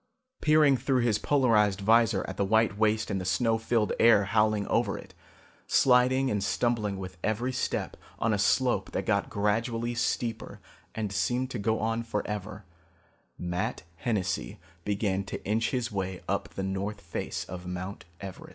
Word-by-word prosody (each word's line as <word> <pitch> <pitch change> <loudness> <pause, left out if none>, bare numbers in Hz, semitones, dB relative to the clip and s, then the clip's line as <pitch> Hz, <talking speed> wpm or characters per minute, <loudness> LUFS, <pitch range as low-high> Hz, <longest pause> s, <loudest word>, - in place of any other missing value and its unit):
Peering 150 -3 +5
through 130 +1 +1
his 115 -3 +2
polarized 110 -8 +3
vizor 115 0 +3
at 95 - -5
the - - 0
white 110 +1 +2
waste 110 +1 +1
and 95 - -1
the - - -4
snow 115 +4 +1
filled 110 -1 +1
air 110 -3 +6
howling 105 0 +2
over 115 -3 0
it, - - -12 0.5
sliding 130 +1 +4
and 105 -1 0
stumbling 105 -3 0
with 95 -1 -7
every 120 +4 -1
step - - -2 0.2
on 115 -1 +1
a 105 - 0
slope 105 -2 +1
that 95 - -2
got 100 -1 +1
gradually 115 +3 0
steeper 120 -1 -2 0.4
and 110 -3 -2
seemed 125 +6 0
to 120 - -4
go 110 +2 0
on 115 +1 0
forever, 105 -2 -4 0.7
Matt 90 0 -3
Hennessy 90 - -2 0.2
began 100 -1 0
to - - -7
inch 110 +3 +1
his 125 -3 -2
way 95 -2 -4
up - - -1
the 95 - -5
north 100 +2 -3
face 85 -2 -4
of 90 0 -8
Mount 90 +2 -6
Everest. 95 -1 -8
110 Hz, 160 wpm, -28 LUFS, 100-115 Hz, 0.7 s, air